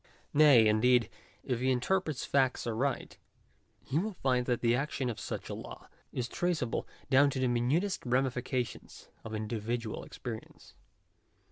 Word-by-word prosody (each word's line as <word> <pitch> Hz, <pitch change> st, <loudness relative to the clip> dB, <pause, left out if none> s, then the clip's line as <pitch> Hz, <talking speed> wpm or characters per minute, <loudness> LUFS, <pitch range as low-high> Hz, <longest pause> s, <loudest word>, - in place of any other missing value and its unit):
Nay, 145 Hz, -6 st, +7 dB
indeed, 115 Hz, +1 st, +3 dB, 0.3 s
if 125 Hz, -3 st, -1 dB
he 130 Hz, +1 st, +1 dB
interprets 155 Hz, +3 st, 0 dB
facts 130 Hz, -2 st, +1 dB
aright, 120 Hz, +4 st, -2 dB, 0.6 s
he 140 Hz, +5 st, 0 dB
will 210 Hz, +4 st, -2 dB
find 125 Hz, -5 st, +1 dB
that 120 Hz, -2 st, 0 dB
the 115 Hz, 0 st, +3 dB
action 135 Hz, -1 st, -1 dB
of 110 Hz, -, -8 dB
such -, -, -5 dB
a -, -, -5 dB
law, -, -, -9 dB, 0.2 s
is 125 Hz, -1 st, -2 dB
traceable 160 Hz, -4 st, -1 dB, 0.2 s
down 140 Hz, +2 st, +6 dB
to 135 Hz, -, -4 dB
the 130 Hz, -, +2 dB
minutest 135 Hz, +12 st, +1 dB
ramifications 125 Hz, -1 st, -2 dB
of 110 Hz, -1 st, -5 dB
individual 110 Hz, +1 st, -3 dB
experience. 115 Hz, -3 st, -9 dB
125 Hz, 140 wpm, -31 LUFS, 120-140 Hz, 0.6 s, Nay